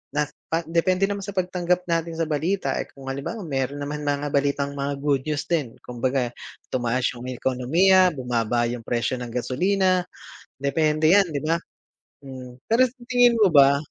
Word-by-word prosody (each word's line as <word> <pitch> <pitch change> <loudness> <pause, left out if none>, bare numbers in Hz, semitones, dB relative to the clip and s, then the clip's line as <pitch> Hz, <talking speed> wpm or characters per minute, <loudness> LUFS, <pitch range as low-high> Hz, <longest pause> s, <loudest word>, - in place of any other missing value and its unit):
na 150 - +3 0.2
pa 165 +1 -1
depende 170 +4 +1
naman 200 +1 0
sa 200 0 -7
pagtanggap 180 -1 0
natin 165 0 -1
sa 165 - 0
balita, 155 -1 -1
eh, - - -4
kung 135 -1 -6
halimbawa 140 +11 -5
meron 135 -3 -2
naman 150 +1 -5
mga 145 0 -1
balitang 140 0 0
mga 140 0 -3
good 140 -3 +2
news 150 -2 -1
din, 150 -9 -2
kumbaga 125 0 -1 0.4
tumaas 125 0 0
'yung 125 0 -9
ekonomiya, 145 +10 +3
bumaba 120 -2 0
yung 120 -2 -7
presyo 120 +1 -1
ng 125 - -5
gasolina, 185 +8 +1 0.5
depende 155 +3 +2
'yan, 200 0 +5
'di 145 -3 -4
ba? 165 +2 +1 0.7
Hmm. 130 -2 -9
Pero 250 +3 +3
sa 250 - -22
tingin 245 -1 +4
mo 205 -6 +4
ba, 140 -1 +7
145 Hz, 170 wpm, -24 LUFS, 130-180 Hz, 0.7 s, ba